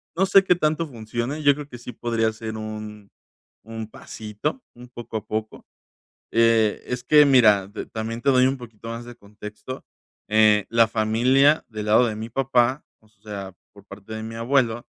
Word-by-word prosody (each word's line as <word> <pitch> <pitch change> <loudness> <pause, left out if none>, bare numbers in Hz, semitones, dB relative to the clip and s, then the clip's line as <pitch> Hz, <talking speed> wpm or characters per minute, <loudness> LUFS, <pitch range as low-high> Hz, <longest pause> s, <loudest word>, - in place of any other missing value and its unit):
No 190 +3 +2
sé, 195 0 +5
qué 180 - +3
tanto 160 0 0
funcione. 120 +4 -5
Yo 145 - +6
creo 145 0 -8
que 120 - -9
sí 120 +1 -9
podría 115 -2 -1
ser 110 0 -6
un 105 -1 -8 0.5
un 110 0 -7
pasito, 110 - -6
un 125 +1 -13
poco 120 -2 -6
a 105 - -8
poco. 110 0 -5 0.7
Eh, 115 -2 +3
es 125 0 -4
que 150 +3 +6
mira, 110 -8 +5
de 105 +2 -7
también 115 +1 -5
te 140 - +3
doy 130 0 +4
un 135 +1 -1
poquito 115 -2 -11
más 115 +1 -6
de 120 0 -11
contexto. 105 +4 -10 0.4
Eh, 105 -1 +4
la 115 -1 +4
familia 125 +7 +3
del 110 -2 -6
lado 120 +3 +5
de 110 - -3
mi 110 +2 -6
papá, 130 +2 +1 0.2
o 110 - -27
sea, 100 -3 -9 0.2
por 100 -1 -17
parte 100 +2 -11
de 110 0 -5
mi 115 +1 -7
abuelo, 120 -1 0
115 Hz, 185 wpm, -23 LUFS, 110-125 Hz, 0.7 s, Yo